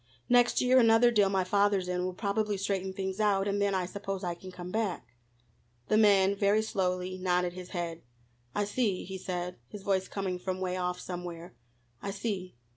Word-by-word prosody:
Next 245 0 +4
year 255 +1 +5
another 230 0 +6
deal 205 -4 +4
my 190 -1 +1
father's 200 0 +2
in 180 0 -1
will 185 0 -3
probably 205 +1 -1
straighten 190 -1 -1
things 190 +1 -4
out, 200 -2 +2
and 200 0 0
then 200 -1 +2
I 185 -1 0
suppose 195 +1 -5
I 175 -1 -1
can 185 +2 -10
come 180 0 -8
back." 205 - -2 0.8
The - - +4
man 200 -2 +5
very 205 +2 +3
slowly 185 -2 -1
nodded 180 -1 +1
his 180 0 -8
head. 170 -2 -4 0.5
"I 205 - +1
see," 205 -2 0
he 190 0 -6
said, 180 -1 -4
his 205 +5 -9
voice 190 -1 +1
coming 190 -2 -3
from 185 0 -3
'way 185 -1 -1
off 180 -1 -2
somewhere, 175 -1 -7 0.5
"I 200 - -4
see." 195 - -4
190 Hz, 190 wpm, -30 LUFS, 180-205 Hz, 0.8 s, another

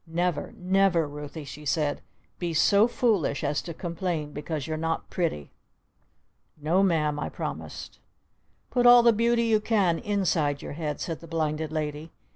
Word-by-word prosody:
"Never, 175 0 -1
never, 185 -3 +2
Ruthie," 150 +1 -8
she 145 +2 -9
said, 150 0 0 0.4
"be 170 -2 -2
so 200 +7 +5
foolish 220 - 0
as 145 0 0
to 170 - -7
complain 170 -3 -3
because 150 0 -4
you're 155 - -3
not 165 +1 -3
pretty!" 160 - -2 1.1
"No'm!" 155 -2 +2
I - - -3
promised. - - -7 0.7
"Put 245 -1 +3
all 245 0 +9
the 235 -1 +6
Beauty 235 +2 +2
you 225 -2 +3
can 200 -6 +1
inside 180 -9 0
your - - -6
head!" 150 -1 -4
said 165 -2 -4
the 165 - -12
Blinded 155 -1 -2
Lady. 155 0 -3
165 Hz, 150 wpm, -27 LUFS, 150-195 Hz, 1.1 s, all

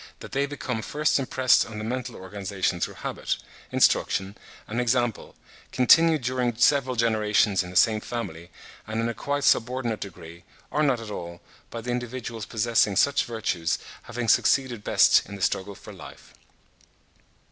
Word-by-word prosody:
that - - -10
they 140 +1 0
become 125 -4 -4
first 150 +4 0
impressed 130 -1 +3
on 110 - -9
the 105 - -5
mental 125 +1 -4
organization 95 -1 -3
through - - -3
habit, - - -3 0.3
instruction 95 +1 +2 0.3
and 115 +3 -2
example, 120 -2 -1 0.4
continued 155 +3 +5
during 125 -1 -1
several 130 +2 +3
generations 110 -3 +2
in 90 - -7
the 90 - -11
same 110 +3 +4
family, 85 -9 -6 0.4
and 110 +1 -3
in 115 - 0
a 115 - -2
quite 145 +5 -3
subordinate 120 -4 +1
degree, 85 -3 -10 0.3
or 150 - 0
not 135 -5 +2
at 110 -2 -8
all, 85 -3 -7 0.3
by 115 - -6
the 120 +2 -4
individuals 120 -2 -5
possessing 110 -2 +1
such 140 +8 +3
virtues 105 -8 -1 0.3
having 120 -1 -4
succeeded 125 -3 +2
best - - +5
in 100 - -7
the 100 - -10
struggle 100 +1 -1
for - - -12
life. - - -13
115 Hz, 160 wpm, -25 LUFS, 105-125 Hz, 0.4 s, continued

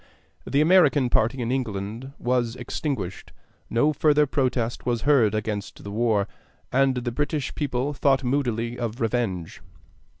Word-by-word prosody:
The 140 - +2
American 150 -6 +4
party 120 +3 +1
in 115 - -2
England 115 +1 -3
was 120 -1 0
extinguished; 120 - -4 0.4
no 145 +7 +2
further 150 0 +4
protest 130 -4 -1
was 120 -2 -1
heard 130 -8 +4
against 105 -2 -4
the 100 - -7
war; 110 -2 +1 0.4
and 135 0 +3
the 120 -1 -2
British 145 +2 -2
people 140 -1 -2
thought 135 -1 +2
moodily 120 -3 -1
of 120 0 -3
revenge. 110 -8 -2
125 Hz, 135 wpm, -25 LUFS, 115-140 Hz, 0.4 s, American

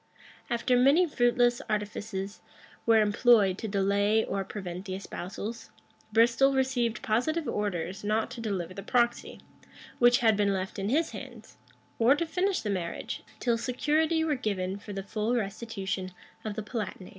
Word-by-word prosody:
After 240 +1 +1
many 275 +8 +5
fruitless 245 -4 +2
artifices 205 -1 -3 0.5
were 225 -1 +6
employed 205 -2 +4
to 220 - -4
delay 200 +2 +2
or 195 - -2
prevent 185 -2 -6
the 185 -2 -4
espousals, 200 +3 -6 0.4
Bristol 235 +5 +4
received 250 -4 0
positive 300 +9 0
orders 190 -2 -2
not 215 +4 0
to 250 -2 -7
deliver 190 -5 -3
the 195 - -7
proxy, 240 +3 0 0.6
which 245 0 +6
had 225 -2 +4
been 200 -1 +2
left 190 +1 -3
in 195 +1 -1
his 315 +6 +1
hands, - - -10 0.4
or 240 +4 +6
to 335 - -1
finish 370 +4 0
the 210 - -2
marriage, 175 -3 -4 0.2
till 235 -2 +1
security 310 +6 +1
were 315 -2 +1
given 200 -7 -2
for 205 - -9
the 195 -1 -4
full 215 +4 -1
restitution 195 -4 -3 0.3
of 215 -2 -4
the 215 - -4
Palatinate. 205 -4 -5
220 Hz, 155 wpm, -29 LUFS, 195-245 Hz, 0.6 s, were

